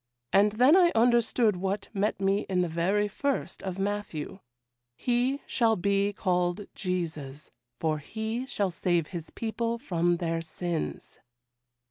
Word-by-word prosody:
And 205 +1 +5
then 255 +8 +6
I 355 -2 +6
understood 230 -2 +3
what 195 +3 -2
met 205 0 0
me 195 +1 +2
in 180 -1 +2
the - - 0
very 185 +6 +1
first 280 +7 -2
of 190 -1 -4
Matthew, 195 -4 -3 0.6
"He 250 - 0
shall 230 -2 +2
be 200 +1 +1
called 180 -1 0
Jesus, 155 -6 -4 0.3
for 155 -1 0
He 220 - -4
shall 200 -8 -1
save 170 -2 0
His 170 -3 -6
people 230 +1 -2
from 175 -8 +1
their 165 -1 -1
sins." 165 0 -4
195 Hz, 135 wpm, -28 LUFS, 175-225 Hz, 0.6 s, then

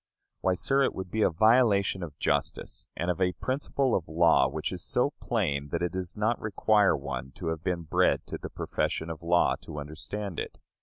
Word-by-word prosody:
Why, 95 -1 +1
sir, 135 +9 +1
it 135 - +1
would 95 -2 -6
be 110 - 0
a - - +5
violation 100 0 +3
of 75 -4 -7
justice, 70 -1 -2
and 85 +1 0
of 90 - -4
a 90 -1 +2
principle 130 - -1
of 85 - 0
law 80 -4 +4
which 75 +3 -3
is 90 -2 -5
so 130 +4 +1
plain 75 -11 -1
that 85 - -2
it 90 - 0
does 95 +2 -5
not 110 +3 +1
require 105 0 +3
one 65 -1 -5
to 85 +3 -4
have 80 0 -4
been 90 -2 -1
bred 80 - +2
to - - -6
the - - -6
profession 80 +1 -2
of 80 - -7
law 85 +1 +3
to 75 - -7
understand 80 +6 -5
it. - - -5
90 Hz, 205 wpm, -28 LUFS, 80-105 Hz, -, a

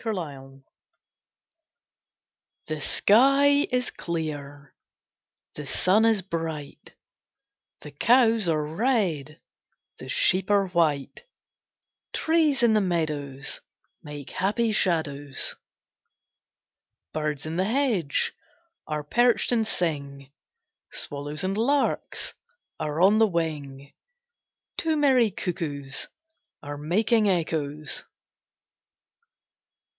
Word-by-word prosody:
A - - -7
MAY - - -1
MORNING 135 -6 -8 2.0
The 155 -1 -4
sky 275 - +4
is 250 0 0
clear, 145 -4 -5 0.8
The 150 -2 -7
sun 200 +9 +3
is 220 -4 +2
bright; 160 -5 -6 0.9
The 150 - -10
cows 230 - +3
are 155 -2 +1
red, 165 - -1 0.6
The - - -9
sheep 185 +1 +2
are 200 -2 +3
white; 160 - 0 0.9
Trees 315 -5 +2
in 230 -2 +5
the 215 - +3
meadows 150 -7 -2 0.4
Make 145 -2 -9
happy 220 +4 0
shadows. 145 -8 0 1.6
Birds 150 -2 -2
in 160 +2 -4
the 185 - +1
hedge 220 - +1 0.5
Are 150 -1 -3
perched 240 +12 +2
and 225 -3 +1
sing; 140 -7 -3 0.6
Swallows 145 +2 -4
and 190 +1 -1
larks 275 +6 0 0.5
Are 155 0 -3
on 205 +4 +5
the 225 - +5
wing: 145 -6 -4 0.8
Two 320 -1 0
merry 260 -6 +4
cuckoos 155 -8 -3 0.6
Are 145 0 -6
making 210 +7 +2
echoes. 155 -4 -1
170 Hz, 95 wpm, -26 LUFS, 145-220 Hz, 2.0 s, in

